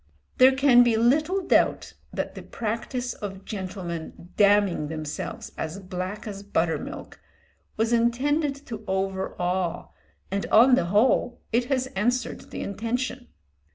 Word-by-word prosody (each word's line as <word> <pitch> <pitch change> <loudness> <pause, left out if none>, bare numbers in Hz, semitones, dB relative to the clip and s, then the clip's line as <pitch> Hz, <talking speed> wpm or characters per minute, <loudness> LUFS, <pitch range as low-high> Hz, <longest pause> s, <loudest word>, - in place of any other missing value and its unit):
There 260 +1 +8
can 265 -3 +6
be 240 -2 +4
little 305 - +2
doubt - - +2 0.2
that - - -3
the - - -8
practice 235 +3 -3
of 195 -2 -7
gentlemen 180 -4 -6
"damning 200 -6 +3
themselves 155 -1 -5
as 160 +4 -3
black 185 +2 -5
as 200 -2 -6
butter 170 -5 0
milk" - - -8 0.6
was 225 +2 +1
intended 275 +6 +1
to 225 -3 -7
overawe, 190 -2 -2 0.4
and 195 0 -1
on 245 +4 +6
the 180 - +4
whole 225 +5 +2
it 240 +1 +2
has 260 0 0
answered 240 +4 -1
the - - -6
intention. 230 - -3
215 Hz, 130 wpm, -25 LUFS, 190-245 Hz, 0.6 s, There